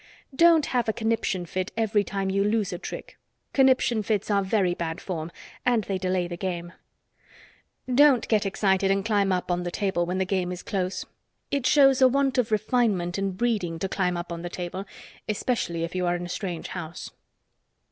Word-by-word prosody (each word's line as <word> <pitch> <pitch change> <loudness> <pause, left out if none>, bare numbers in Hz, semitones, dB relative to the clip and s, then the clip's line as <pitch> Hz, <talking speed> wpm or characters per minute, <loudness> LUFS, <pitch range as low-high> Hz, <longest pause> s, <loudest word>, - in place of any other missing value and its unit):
Don't 335 -1 +6
have 240 -3 0
a - - +1
conniption 220 -5 -1
fit 185 +3 -3
every 220 -2 +2
time 195 -1 -2
you 195 +1 +2
lose 210 -2 0
a 175 - -5
trick. - - -8 0.3
Conniption 260 -4 +3
fits 210 0 -1
are 200 -1 +3
very 190 -2 +1
bad 165 -1 -4
form, 165 -3 -5 0.3
and 240 -3 +2
they 195 -2 -3
delay 185 -1 0
the 175 - -5
game. 175 -2 -4 1.1
Don't 260 -1 +5
get 215 -2 +2
excited 195 -1 +1
and 195 0 +1
climb 205 -3 +2
up 180 -1 -1
on 175 0 0
the 175 - -3
table 185 -2 -1
when 180 +1 -1
the 190 - +1
game 185 -1 -1
is 180 0 -6
close. 185 -3 -2 0.5
It 275 -3 +1
shows 270 -3 +5
a 260 - +8
want 270 0 +1
of 235 -2 0
refinement 210 -5 +1
and 195 -2 -2
breeding 205 -8 0
to 195 - -2
climb 180 -2 0
up 175 0 -6
on 170 0 -5
the 175 - -5
table, 180 +2 -5 0.4
especially 205 -6 -1
if 170 - -4
you 180 -1 -1
are 175 - +2
in 175 0 -4
a - - -8
strange 180 -3 -4
house. 170 -2 -7
195 Hz, 195 wpm, -26 LUFS, 180-225 Hz, 1.1 s, a